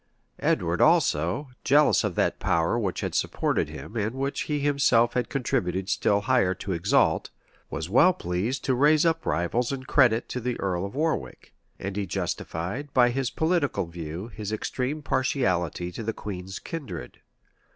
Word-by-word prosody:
[] - - -39
Edward - - +1
also, 85 - +2
jealous 145 -1 +4
of 105 -5 -2
that - - +1
power 85 +8 +1
which 100 -5 -2
had - - -3
supported - - 0
him 75 - -9
and 110 +2 -1
which 135 +1 -2
he 150 - +1
himself 140 -5 +3
had 125 -2 -1
contributed 95 - -1
still 100 +1 +2
higher 105 -6 +2
to 95 - -5
exalt, 85 +2 +2 0.4
was 80 - -4
well 130 - +5
pleased 110 - -3
to 130 - +2
raise 150 +5 +4
up 165 0 +1
rivals 115 +9 0
in 135 -1 -4
credit 125 -4 +3
to 125 - -3
the 125 0 -3
earl 95 -1 -1
of 100 - -11
Warwick; 160 +2 -2 0.2
and 95 0 -5
he 100 -1 -2
justified, 95 - -3
by 125 -2 +5
this 130 0 -1
political 160 - 0
view, 85 +4 -7
his 105 -2 -6
extreme 130 +7 -3
partiality 90 - 0
to 90 - -7
the 115 0 -2
queen's 95 -2 -6
kindred. 100 - -7
115 Hz, 165 wpm, -26 LUFS, 90-135 Hz, 0.4 s, well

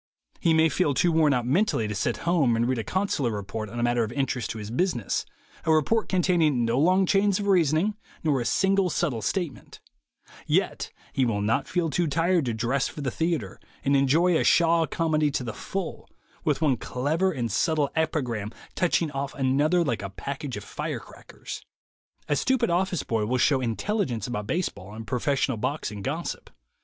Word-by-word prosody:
He 165 -3 +3
may 160 0 +5
feel 155 -4 +1
too 175 - +3
worn 160 -2 +4
out 125 -3 +1
mentally 135 - +1
to 105 - -3
sit 115 +3 -1
home 155 -9 +3
and 115 +1 +1
read 130 -2 0
a - - -2
con 190 - -1
sular 130 -10 0
report 105 +1 -5
on 120 +3 -6
a - - 0
matter 120 -1 +2
of 110 - -4
interest 130 -3 -1
to 115 - -4
his 105 0 -6
business, 125 - -1 0.4
a 160 - +2
report 160 +9 +2
containing 165 -9 +2
no 115 +3 +1
long 185 +5 +4
chains 195 +1 +3
of 205 - -3
reasoning 180 +1 +3 0.3
nor 145 -5 +2
a - - -3
single 195 +5 +2
subtle 150 -9 -1
statement; 170 - -3 0.7
yet - - 0 0.2
he 135 - +2
will 110 -4 0
not 110 +2 +1
feel 175 -3 0
too 175 +4 +1
tired 165 +2 +2
to 120 - -1
dress 125 +5 0
for 150 - -7
the 130 -3 -1
theatre 160 - -2 0.3
and 140 - +3
enjoy 155 +6 +3
a - - +2
Shaw 165 -1 +4
comedy 155 -2 +1
to 135 - -2
the 115 -3 -4
full, 190 - -5 0.3
with 150 -1 0
one 135 -5 +3
clever 155 +12 0
and 120 -7 -3
subtle 155 -3 +1
epigram 125 -10 -1 0.2
touching 170 -3 +1
off 140 0 -4
another 145 +6 +2
like 120 -7 -1
a 100 - -5
package 135 +4 -5
of 105 - -7
fire - - -4
crackers. - - -10 0.7
A 145 - +1
stupid 260 - +1
office 180 -2 0
boy 110 -2 -1
will 125 +2 +1
show 130 +1 +3
intelligence 125 - -1
about 105 -4 -4
baseball 105 - -3
and 110 0 -7
professional 130 +1 0
boxing 105 -4 -3
gossip. - - -4
145 Hz, 190 wpm, -26 LUFS, 120-170 Hz, 0.7 s, may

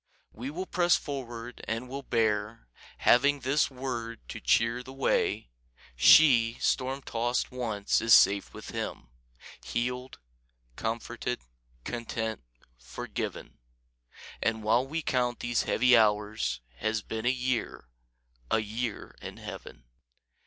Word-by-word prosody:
We 125 +5 -6
will 180 +6 -4
press 175 -2 +3
forward 120 -4 -6
and 115 +3 -3
will 135 +2 -5
bear, 110 - -1 0.3
Having 140 +3 +4
this 135 +4 +2
word 125 -4 -5
to - - -6
cheer 115 +2 +2
the 130 - -11
way: 135 - 0 0.4
She, 115 - +6
storm 130 +1 0
tossed 120 +2 -1
once, 110 -5 0
is 115 -1 +7
safe 100 0 +4
with - - -10
Him, - - -5 0.5
Healed, 125 - -3 0.6
comforted, 115 - -3 0.4
content, 115 - -3 0.4
forgiven; - - -6 0.8
And 110 -1 0
while 115 +5 +2
we 160 +3 -3
count 125 -2 0
these 120 -1 0
heavy 125 +1 +5
hours 105 - +2 0.2
Has 110 - -1
been 110 +1 -4
a - - +6
year, 125 - -2 0.6
a - - +3
year 110 +1 -4
in - - -8
Heaven. - - -9
120 Hz, 120 wpm, -29 LUFS, 110-130 Hz, 0.8 s, is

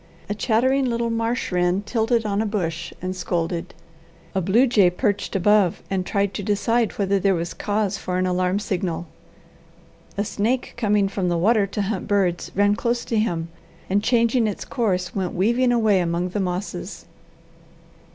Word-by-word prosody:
A 205 - -1
chattering 260 +6 +2
little 235 -1 -1
marsh 230 0 -1
wren 180 +2 +1
tilted 225 +1 0
on 205 0 0
a - - 0
bush 170 -5 -3
and 185 0 -2
scolded. 175 -1 -3 0.6
A 190 - 0
blue 210 +9 +4
jay 210 -8 +4
perched 205 +2 -1
above 195 -1 +3
and 190 -1 0
tried 200 -1 0
to - - -4
decide 215 +3 +1
whether 200 -1 +1
there 195 0 +2
was 170 0 -3
cause 210 -1 -1
for 180 0 -3
an 185 - +1
alarm 180 +1 +1
signal. 185 -4 -2 1.1
A 205 - 0
snake 225 +4 -1
coming 210 -4 +2
from 195 -2 -2
the 175 - +1
water 205 +3 +3
to 205 +1 -2
hunt 195 -1 -3
birds 190 -4 +1
ran 205 +1 +3
close 235 +1 -1
to 225 - 0
him, 170 -6 -1 0.4
and 200 +1 +3
changing 235 -1 +3
its 205 - -4
course, 185 -7 -1
went 190 -3 -2
weaving 235 +7 +2
away 220 -5 +3
among 175 +1 -1
the 205 - -3
mosses. 185 +1 -4
200 Hz, 170 wpm, -23 LUFS, 180-225 Hz, 1.1 s, blue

